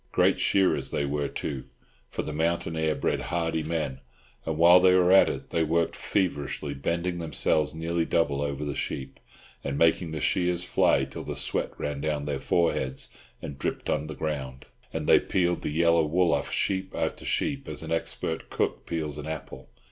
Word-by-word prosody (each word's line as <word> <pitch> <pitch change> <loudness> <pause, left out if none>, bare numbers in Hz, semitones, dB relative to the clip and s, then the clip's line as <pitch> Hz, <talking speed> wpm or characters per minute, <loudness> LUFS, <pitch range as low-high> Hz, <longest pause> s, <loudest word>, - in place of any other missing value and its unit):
Great - - +3
shearers 95 -1 +2
they 70 - -1
were, 70 0 -1
too, 70 -2 -4 0.4
for - - -3
the 75 - -5
mountain 80 +1 0
air 80 -1 +1
bred - - 0
hardy 80 -2 -1
men, 75 -4 -2 0.5
and 80 -1 -1
while 85 +2 +8
they 90 0 +5
were 90 0 +4
at 95 - +7
it - - -6
they 85 - +2
worked 80 +1 +1
feverishly, 75 -6 -1
bending 85 +5 -2
themselves 80 -1 0
nearly 85 +1 -1
double 75 -4 +1
over 70 0 -2
the 70 - -2
sheep, 65 -1 -4 0.4
and 70 0 -2
making 85 +1 +3
the 80 0 -4
shears 90 +2 +1
fly 90 - +3
till - - -8
the - - -5
sweat - - -2
ran 70 -1 -3
down 75 -1 -1
their 70 -2 -2
foreheads 65 -5 0 0.3
and 70 -1 -6
dripped - - -2
on 75 - -1
the 75 - -6
ground; 65 -4 -4 0.3
and - - -3
they - - +7
peeled 90 -1 0
the - - -2
yellow 85 +2 +3
wool 85 +3 +2
off - - -1
sheep 95 -1 -1
after - - -2
sheep 140 -2 -1
as - - -5
an 80 - -6
expert 80 0 -3
cook - - -2
peels 75 -3 -3
an 75 - -6
apple. 65 -4 -7
80 Hz, 185 wpm, -27 LUFS, 75-85 Hz, 0.5 s, while